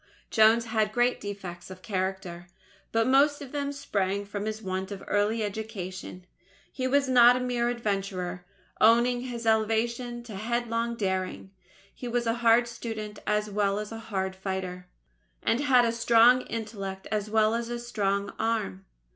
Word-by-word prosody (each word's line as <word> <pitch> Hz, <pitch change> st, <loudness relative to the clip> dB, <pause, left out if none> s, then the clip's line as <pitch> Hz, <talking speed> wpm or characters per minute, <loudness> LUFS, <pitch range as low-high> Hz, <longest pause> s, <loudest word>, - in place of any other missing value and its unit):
Jones 225 Hz, +1 st, +5 dB
had 220 Hz, -2 st, 0 dB
great 245 Hz, +1 st, +2 dB
defects 190 Hz, -4 st, -7 dB
of 185 Hz, 0 st, -11 dB
character; 185 Hz, -3 st, -3 dB, 0.4 s
but 225 Hz, 0 st, +2 dB
most 280 Hz, +3 st, +4 dB
of 275 Hz, -3 st, -9 dB
them 285 Hz, -1 st, -2 dB
sprang 200 Hz, -8 st, -2 dB
from 205 Hz, 0 st, -5 dB
his 215 Hz, 0 st, -3 dB
want 190 Hz, -1 st, -4 dB
of 195 Hz, -1 st, -6 dB
early 210 Hz, +2 st, +1 dB
education. 195 Hz, -4 st, -6 dB, 0.5 s
He 255 Hz, -1 st, -1 dB
was 275 Hz, +1 st, +2 dB
not 245 Hz, -1 st, +7 dB
a -, -, -1 dB
mere 245 Hz, -1 st, 0 dB
adventurer 195 Hz, -6 st, -3 dB, 0.4 s
owing 240 Hz, +2 st, +5 dB
his 240 Hz, -2 st, -6 dB
elevation 235 Hz, +2 st, 0 dB
to 225 Hz, -4 st, -9 dB
headlong 235 Hz, +1 st, -1 dB
daring 190 Hz, -2 st, -2 dB, 0.4 s
he 250 Hz, -, -7 dB
was 240 Hz, 0 st, -1 dB
a 230 Hz, -, +2 dB
hard 235 Hz, +1 st, +5 dB
student 220 Hz, -3 st, -6 dB
as 210 Hz, 0 st, 0 dB
well 200 Hz, -1 st, +1 dB
as 210 Hz, +1 st, -5 dB
a 225 Hz, -, -6 dB
hard 190 Hz, -2 st, -2 dB
fighter, 190 Hz, -1 st, -4 dB, 0.6 s
and 230 Hz, -, +2 dB
had 260 Hz, -4 st, +4 dB
a 230 Hz, -, +2 dB
strong 235 Hz, +2 st, +5 dB
intellect 200 Hz, -4 st, -5 dB
as 210 Hz, -1 st, -1 dB
well 215 Hz, 0 st, +3 dB
as 235 Hz, +1 st, -3 dB
strong 200 Hz, -3 st, -1 dB
arm. 220 Hz, -, -1 dB
220 Hz, 155 wpm, -28 LUFS, 195-235 Hz, 0.6 s, not